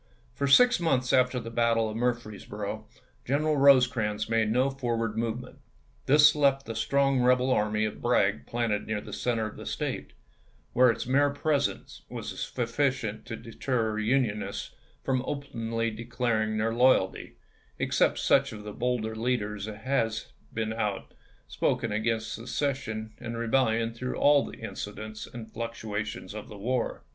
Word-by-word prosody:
For 140 - -1
six 245 - +6
months 130 -7 +1
after 125 0 +3
the 115 -1 -7
battle 115 -1 +2
of 110 - -5
Murfreesboro 110 -3 -3 0.4
General 150 +3 +1
Rosecrans 125 -6 +4
made 115 -1 +2
no 130 +4 +2
for 125 -4 -2
ward 115 -2 -2
movement. 115 +2 -3 0.5
This 145 +2 +7
left 140 -2 +2
the 115 - -5
strong 135 +3 +2
rebel 125 +1 +3
army 105 -2 +1
of 110 - -5
Bragg - - +2
planted 115 -3 -1
near 110 -1 -1
the - - -9
center 115 -3 0
of 110 - -7
the - - -9
State, - - -3 0.6
where 125 +1 +6
its 115 - -1
mere 140 +3 +3
presence 145 -1 -1
was - - -6
sufficient 125 -2 -1
to 115 - -4
deter 115 -1 -2
Unionists 110 -2 -1 0.3
from 130 -1 +1
openly 115 -5 -2
declaring 115 -1 -1
their 110 +1 0
loyalty, 125 -6 +2 0.4
except - - +2
such - - +3
of 105 -1 -8
the 105 0 -7
bolder 115 -2 -1
leaders 110 -3 -2
as 105 -1 -6
had 115 -4 +1 0.4
been 110 -1 -2
out 105 -3 -3 0.3
spoken - - 0
against 110 +1 -1
secession 115 -3 -3
and 115 -1 -5
rebellion 115 -1 +1
through 125 +2 -4
all 145 -1 +5
the - - -8
incidents 110 -1 -6
and 115 -2 -9
fluctuations 110 -4 -4
of 105 -1 -7
the 105 - -10
war. 125 +4 -2
115 Hz, 150 wpm, -28 LUFS, 110-130 Hz, 0.6 s, This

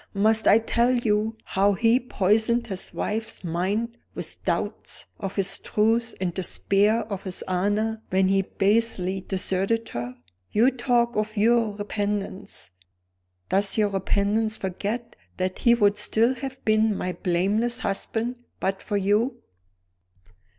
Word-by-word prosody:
Must 220 +2 +3
I 210 - +8
tell 235 +2 +1
you 225 -3 +1
how 200 +1 +2
he 230 +4 +3
poisoned 225 +1 +1
his 195 -5 -5
wife's 220 0 -3
mind 200 +8 -1 0.2
with - - -5
doubts - - -2
of 195 -1 -4
his 195 -1 +1
truth 225 +2 +1
and 180 -2 -1
despair 200 +4 +1
of 200 -3 -5
his 185 -2 -4
honor, 205 +4 0
when 190 0 +3
he 195 0 +3
basely 195 -2 +1
deserted 195 +4 -1
her? 120 +1 -5 0.4
You 235 +5 +4
talk 240 -2 +1
of 215 +1 -2
your 225 0 +3
repentance. 205 - -4 0.8
Does 200 +2 +2
your 210 -1 +3
repentance 205 +3 0
forget 205 +5 -4 0.2
that 185 0 -2
he 235 0 +5
would 205 -2 +3
still 225 +4 +3
have 265 0 -6
been 215 -1 +3
my 180 - -2
blameless 205 +8 0
husband 230 +3 -2 0.2
but 195 0 -1
for 205 - -2
you?" 205 +6 +1
210 Hz, 135 wpm, -25 LUFS, 195-230 Hz, 0.8 s, I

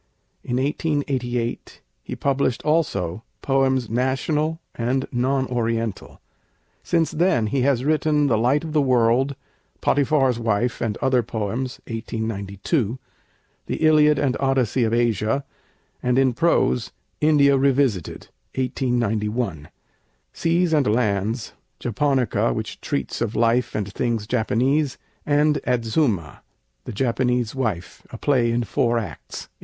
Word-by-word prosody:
In 125 - -2
1888 130 -4 -2 0.2
he - - -6
published 135 -3 0
also 110 - 0 0.2
'Poems 135 -2 +2
National 140 +7 0
and 125 +3 -1
Non 130 +2 +1
Oriental.' 115 -3 -3 0.6
Since 165 -2 +1
then 165 -8 +2
he 130 +5 0
has 130 -1 +1
written 150 -1 +2
'The 125 -5 +2
Light 130 +6 +2
of 160 -2 -6
the 150 - +3
World'; 130 +1 +2 0.4
'Potiphar's 135 -3 +2
Wife, 115 +1 0
and 110 -4 -1
Other 130 -2 +3
Poems' 115 +3 -4
(1892); 110 - -3 0.7
'The - - -2
Iliad 150 -1 +4
and 135 -3 +1
Odyssey 130 -3 +1
of 110 - 0
Asia,' 115 +2 +1 0.6
and 125 0 +1
in 135 -2 +3
prose, 120 - +1 0.3
'India 145 -2 +4
Revisited' 135 - 0 0.3
(1891); 115 - -1 0.7
'Seas 170 0 +1
and 145 -6 +3
Lands'; 105 0 0 0.3
'Japonica,' 125 - +1
which - - -5
treats 70 - -3
of 115 -1 -1
life 115 +1 +2
and 100 -1 -3
things 115 -4 -1
Japanese; 130 +5 +1 0.3
and 150 0 +3
'Adzuma, 115 - 0 0.4
the - - -5
Japanese 125 0 0
Wife: 110 -10 -3
a - - -7
Play 125 -5 +2
in 120 +1 0
Four 120 0 +1
Acts' 110 -4 -6
(1893). - - -30
125 Hz, 120 wpm, -23 LUFS, 115-140 Hz, 0.7 s, Iliad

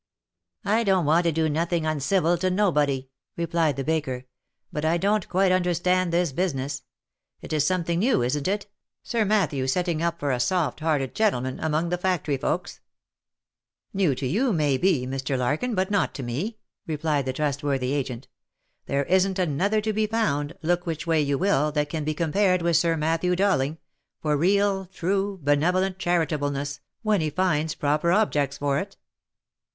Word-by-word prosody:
"I 220 +3 +2
don't 190 -5 +2
want 165 +4 +3
to 170 - +3
do 160 0 +1
nothing 165 +2 0
uncivil 160 +3 +1
to 185 +1 +1
nobody," 150 -9 +1 0.3
replied 165 -3 +1
the 135 - -3
baker, 135 -5 -2 0.2
" - - -43
but 150 - -3
I 160 +2 +2
don't 200 +2 0
quite 185 +1 +3
understand 180 0 +1
this 170 -2 +1
business. 140 -4 -2 0.6
It - - -6
is 150 -1 +2
some 185 -2 +1
thing 170 0 -1
new, 230 - +2
isn't 140 +5 -1
it, 200 +1 -1 0.4
Sir 230 -3 0
Matthew 190 -11 +1
setting 170 +3 0
up 170 0 -1
for 145 -1 -1
a 125 - 0
soft 165 +6 0
hearted 150 -5 0
gentle 215 - +2
man, 130 0 -4
among 160 +2 0
the 180 0 -1
factory 175 -6 0
folks 175 +6 -3 0.6
?" - - -60
"New 185 -9 +2
to. 130 - -4
you, 230 - +1
may 150 -7 +2
be, 155 -4 +2
Mr. 135 +1 -2
Larkin, 150 - -1
but 190 +1 0
not 200 - +1
to 135 - -5
me," 155 - -3 0.3
replied 150 -3 -1
the 130 - -1
trustworthy 140 -2 -1
agent. 130 -3 -3 0.3
" - - -49
There 140 0 0
isn't 190 +2 +2
another 185 +5 +1
to 215 0 -1
be 215 +1 +1
found, 160 -10 0
look 175 +2 0
which 160 -2 -3
way 165 -2 +2
you 140 -1 0
will, 155 -5 +2
that 150 -1 0
can 160 -2 -3
be 155 +1 -2
compared 180 +3 +2
with 170 -1 +2
Sir 165 0 +3
Matthew 165 +3 +1
Dowling, 170 -6 +1 0.4
for 150 -1 0
real, 195 +4 +2
true, 195 +2 -1
benevolent, 180 +6 +1
charitableness, 145 -5 -1 0.2
when 215 -4 +2
he 155 - 0
finds 155 -1 0
proper 150 +4 +1
objects 145 -9 +1
for 140 -1 0
it." 195 +3 -7
165 Hz, 180 wpm, -25 LUFS, 145-185 Hz, 0.6 s, want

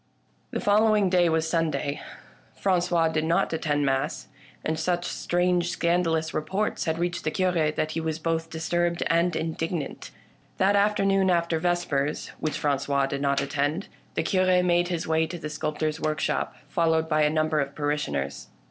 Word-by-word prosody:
The - - -3
following 210 -2 +3
day 175 -2 +4
was 160 0 +1
Sunday. 160 -3 -1 0.6
Frangois 175 -3 +2
did 155 -1 0
not 165 +1 +1
attend 145 -2 0
mass, 135 -1 -1 0.4
and 160 0 -1
such 175 +1 0
strange 175 0 0
scandalous 170 -2 0
reports 195 +7 -1
had 160 -1 0
reached 175 +1 -2
the 155 - 0
Cure 175 -3 +1
that 155 0 -2
he 165 - -2
was 160 -1 -2
both 165 0 -2
disturbed 170 +2 -1
and 170 +1 +2
indig 160 +1 -2
nant. 160 -6 -5 0.5
That 195 +2 +3
afternoon, 195 -2 +3
after 170 -2 +1
vespers 160 -4 -1
(which 155 -1 -2
Francois 140 -1 +1
did 140 0 -3
not 140 -1 +2
attend), 145 +6 -1 0.3
the - - 0
Cure 185 0 +3
made 175 0 +2
his 175 -1 -2
way 160 0 +2
to 175 - -6
the 155 -2 -6
sculp 155 0 -3
tor's 155 0 -1
workshop, 155 0 -1
followed 160 -1 +1
by 155 -1 +2
a 150 - +4
number 155 0 +1
of 140 0 -2
parishioners. 75 - -2
160 Hz, 165 wpm, -26 LUFS, 155-175 Hz, 0.6 s, day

